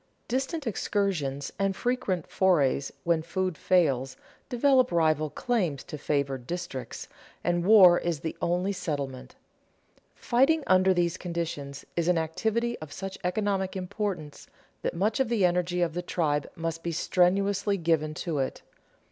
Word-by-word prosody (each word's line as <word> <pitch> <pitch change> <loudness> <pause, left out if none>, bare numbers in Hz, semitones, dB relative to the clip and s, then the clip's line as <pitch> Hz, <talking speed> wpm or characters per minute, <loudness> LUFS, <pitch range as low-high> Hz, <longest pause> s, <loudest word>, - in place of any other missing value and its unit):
Distant 270 +5 -2
excursions 170 - -1
and 195 -1 +1
frequent 240 -9 -1
forays, 145 -7 +2
when 170 -1 +2
food 185 +2 -2
fails, 140 -8 +1 0.3
develop 255 0 +3
rival 155 -2 +2
claims 180 - -1
to - - -8
favored 140 -4 -2
districts, 175 -7 -5 0.4
and 175 0 +1
war 185 -3 +8
is 170 -5 -2
the 160 - -4
only 180 +3 +1
settlement. 145 -8 -4 0.8
Fighting 285 +5 +2
under 185 0 +4
these 175 -1 +1
conditions 160 -5 -5
is 170 -1 0
an 180 -1 +3
activity 220 +9 -1
of 155 -2 -9
such 195 +3 -6
economic 190 +1 -1
importance 180 -5 -4 0.3
that - - -2
much 210 +8 0
of 265 -3 +1
the 220 -6 +3
energy 180 0 +1
of 165 -2 -1
the 175 - -2
tribe 150 -5 -1
must 165 0 -3
be 170 - -3
strenuously 195 +4 +2
given 160 -3 0
to 160 -4 -2
it. 135 - -3
175 Hz, 140 wpm, -28 LUFS, 155-195 Hz, 0.8 s, war